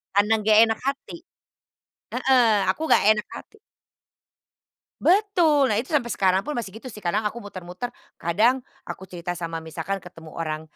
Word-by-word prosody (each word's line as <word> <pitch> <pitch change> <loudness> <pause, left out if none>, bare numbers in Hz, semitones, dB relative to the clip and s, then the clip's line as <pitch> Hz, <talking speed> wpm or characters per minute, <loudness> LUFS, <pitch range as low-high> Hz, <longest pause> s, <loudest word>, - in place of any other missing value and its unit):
Karena 205 +2 +4
gak 215 -1 +6
enak 225 -1 0
hati, 275 +4 -3 1.0
heeh. 260 -1 +3 0.3
Aku - - -13
nggak - - +5
enak 210 -1 -5
hati. 435 - -12 1.4
Betul! 345 -8 +3
Nah, 215 - +1
itu 250 +8 -3
sampai 285 -6 +1
sekarang 190 -5 +2
pun 300 +7 -5
masih 230 -5 -4
gitu 255 - -10
sih. 210 -4 -10
Kadang 210 +5 0
aku 235 +2 -8
muter-muter, 185 +3 -7 0.2
kadang 225 +10 +1 0.2
aku - - -7
cerita 175 -1 -6
sama 165 -2 -4
misalkan 165 +5 -4
ketemu 165 -3 -13
orang, 155 -1 -4
210 Hz, 155 wpm, -24 LUFS, 180-255 Hz, 1.4 s, gak